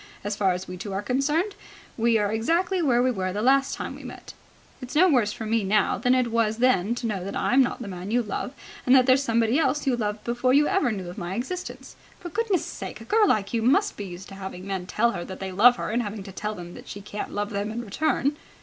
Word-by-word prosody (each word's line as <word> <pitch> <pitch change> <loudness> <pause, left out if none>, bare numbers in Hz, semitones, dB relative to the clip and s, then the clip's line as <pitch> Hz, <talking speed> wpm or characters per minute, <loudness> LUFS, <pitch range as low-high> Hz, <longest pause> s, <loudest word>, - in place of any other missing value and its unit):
As 205 +1 -2
far 195 -2 +2
as 180 +1 -5
we 180 - -7
two 200 +1 -6
are 195 +2 -2
concerned, 295 - 0 0.4
we 230 0 +3
are 205 -1 0
exactly 340 - +1
where 245 -6 +3
we 255 - +3
were 185 -5 -2
the 205 +3 -3
last 270 +2 +3
time - - -5
we - - -11
met. - - -10 0.5
It's 255 +2 -7
no 360 +5 +6
worse 245 - +3
for 225 0 -6
me 225 0 +1
now 205 +1 +2
than 250 +1 +3
it 250 -2 +1
was 225 -1 +1
then 235 -3 +2
to 240 - -5
know 200 -5 -2
that 195 - -5
I'm 265 +3 +3
not 245 -1 -1
the - - -7
man 185 0 -6
you 240 +2 +2
love, 215 +3 -4 0.4
and 255 - +7
that 255 -1 +6
there's 260 +1 +5
somebody 230 +1 +2
else 295 -1 +1
you 265 -3 +2
loved 210 -2 -3
before 240 +2 +1
you 295 +1 +5
ever 290 -11 +2
knew 190 -4 -5
of 175 - -7
my 175 +2 -4
existence. 360 - -5 0.2
For 350 - -7
goodness' 415 0 0
sake, - - -7
a - - -11
girl 430 -1 +4
like 205 - +1
you 230 - +1
must 285 - +3
be 205 - -6
used 180 0 -9
to - - -10
having 190 -1 -7
men 190 -2 -4
tell 235 +4 +2
her 175 - -4
that 190 +1 -8
they 190 -1 -4
love 235 +7 +6
her - - -4
and 235 +2 +1
having 210 -2 -5
to 195 - -9
tell 210 +3 -4
them 175 -2 -9
that - - -12
she 205 - -7
can't 210 +1 -6
love 205 0 -3
them 200 +1 -2
in 235 +2 -5
return." 290 +5 0
230 Hz, 265 wpm, -25 LUFS, 200-260 Hz, 0.5 s, and